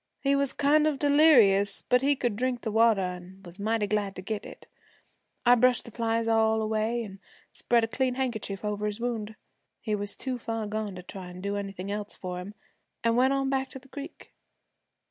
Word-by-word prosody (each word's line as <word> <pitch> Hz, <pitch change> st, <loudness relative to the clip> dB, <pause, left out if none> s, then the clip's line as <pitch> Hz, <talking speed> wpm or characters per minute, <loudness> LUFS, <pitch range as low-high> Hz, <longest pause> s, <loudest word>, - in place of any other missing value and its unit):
He 275 Hz, 0 st, +2 dB
was 280 Hz, -1 st, +1 dB
kind 300 Hz, +2 st, +3 dB
of 300 Hz, -3 st, 0 dB
delirious, 265 Hz, -10 st, +5 dB
but 250 Hz, 0 st, +3 dB
he 285 Hz, +1 st, +3 dB
could 240 Hz, -5 st, -1 dB
drink 250 Hz, +1 st, -1 dB
the 220 Hz, -, -3 dB
water, 225 Hz, -2 st, +4 dB
an' 180 Hz, +1 st, -7 dB
was 175 Hz, +3 st, -10 dB
mighty 220 Hz, +1 st, 0 dB
glad 205 Hz, -2 st, -1 dB
to 185 Hz, -, -7 dB
get 215 Hz, +1 st, -4 dB
it. -, -, -12 dB, 0.8 s
I 245 Hz, -, +7 dB
brushed 250 Hz, 0 st, +3 dB
the 235 Hz, -, -10 dB
flies 230 Hz, 0 st, -1 dB
all 220 Hz, 0 st, +3 dB
away, 220 Hz, +2 st, 0 dB
an' 195 Hz, -3 st, -10 dB, 0.3 s
spread 235 Hz, -1 st, +2 dB
a -, -, +1 dB
clean 255 Hz, +2 st, -1 dB
handkerchief 220 Hz, -6 st, -3 dB
over 210 Hz, 0 st, -1 dB
his 210 Hz, +1 st, -4 dB
wound, 225 Hz, -3 st, -3 dB, 0.4 s
he 215 Hz, -, -3 dB
was 205 Hz, -1 st, -1 dB
too 255 Hz, -2 st, -4 dB
far 225 Hz, -1 st, -3 dB
gone 210 Hz, -1 st, -3 dB
to 180 Hz, -, -8 dB
try 185 Hz, 0 st, -9 dB
an' 180 Hz, 0 st, -10 dB
do 200 Hz, +2 st, -3 dB
anything 195 Hz, -1 st, -5 dB
else 205 Hz, 0 st, -4 dB
for 180 Hz, -1 st, -5 dB
him, 200 Hz, +4 st, -8 dB, 0.5 s
an' 230 Hz, 0 st, +2 dB
went 260 Hz, +2 st, +4 dB
on 270 Hz, 0 st, 0 dB
back 265 Hz, 0 st, 0 dB
to -, -, -7 dB
the 265 Hz, +1 st, -16 dB
creek. 285 Hz, +4 st, -10 dB
225 Hz, 205 wpm, -28 LUFS, 205-255 Hz, 0.8 s, I